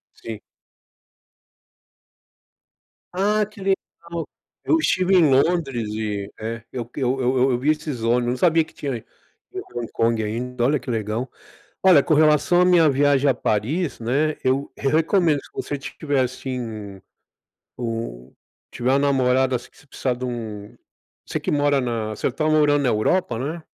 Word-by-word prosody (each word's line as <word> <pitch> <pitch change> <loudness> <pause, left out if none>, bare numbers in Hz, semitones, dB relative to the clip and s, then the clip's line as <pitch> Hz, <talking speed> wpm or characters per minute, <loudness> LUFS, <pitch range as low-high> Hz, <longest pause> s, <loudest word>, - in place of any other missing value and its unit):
Sim. 110 -2 -7 2.7
Ah, 210 +3 +2
que 210 -1 -14
legal. 195 0 +3 0.9
Eu 325 - +4
estive 185 - +2
em 165 -5 +5
Londres 135 -5 +1
e, 105 -2 -3
eh, 115 +1 -5
eu 120 -2 -5
eu 130 -1 0
eu 130 +1 +1
eu 130 +1 +3
eu 120 - 0
vi 140 +4 0
esses 150 -5 -4
ônibus, 120 +1 +2
não 125 - -2
sabia 165 0 +4
que - - -20
tinha 135 -5 -3 0.6
em - - -4
Hong 120 -2 -3
Kong 115 -1 +1
ainda. 120 +3 -3
Olha, 145 +3 +2
que - - -9
legal. 115 +3 -2 0.5
Olha, 180 -6 +7
com 155 - +1
relação 155 +3 +4
à - - +5
minha 175 -3 +5
viagem 140 0 +3
a 135 - +4
Paris, 130 - -1
né. 145 +7 0
Eu 130 +2 0
eu 140 - 0
recomendo 160 -2 +2
se - - -17
você 145 - -4
tiver, 140 0 -2
assim, 115 -6 -5 0.8
um 115 - -5 0.4
tiver 125 +1 -1
uma 135 - +4
namorada, 130 -2 +2
assim, 120 - -10
que - - -24
você 145 - -20
precisar 130 -2 -2
dum 115 -5 -6 0.5
você - - -4
que - - -2
mora 145 -1 +2
na 115 -3 -2
você 110 - -2
tá 145 +5 -3
morando 150 -2 +3
na 130 - +2
Europa, 120 +3 +1
né? 155 +6 -4
130 Hz, 160 wpm, -22 LUFS, 115-155 Hz, 2.7 s, Olha